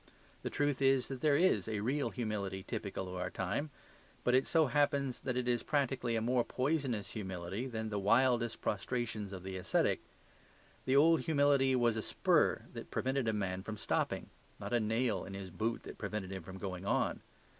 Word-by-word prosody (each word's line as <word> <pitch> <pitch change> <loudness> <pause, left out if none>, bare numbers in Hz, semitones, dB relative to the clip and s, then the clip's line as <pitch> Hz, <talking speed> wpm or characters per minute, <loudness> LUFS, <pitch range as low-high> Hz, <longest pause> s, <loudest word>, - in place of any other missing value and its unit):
The - - -3
truth 145 -2 0
is 135 -2 +3
that 135 -2 -5
there 150 -2 +4
is 180 -2 +3
a 110 -2 -1
real 135 +6 0
humility 100 -5 -3
typical 95 -1 -4
of 90 0 -5
our 90 - -1
time; 100 +13 -2 0.5
but 125 - +2
it 130 +1 +4
so 160 -2 +4
happens 140 -1 +1
that 130 -2 -2
it 125 -1 -1
is 120 -1 +2
practically 135 -5 0
a 110 - +1
more 120 +1 +2
poisonous 130 -6 -1
humility 95 +2 -4
than 110 -3 -3
the 105 -1 -1
wildest 120 +3 +3
prostrations 110 -1 -2
of 95 -2 -7
the 95 0 -5
ascetic. 90 - +1 0.9
The 130 - +2
old 160 +3 +6
humility 140 -4 +3
was 120 -2 +2
a - - 0
spur - - +2
that - - -7
prevented 130 -1 0
a - - +3
man 95 -3 -2
from 110 +2 -6
stopping; - - -1 0.3
not - - -5
a 120 - +4
nail 110 -2 0
in 95 - -7
his 95 -2 -7
boot 115 +5 -2
that - - -9
prevented 100 -2 -4
him 95 -1 -4
from 95 +3 -9
going 95 -2 -5
on. 100 - 0
115 Hz, 190 wpm, -34 LUFS, 100-135 Hz, 0.9 s, old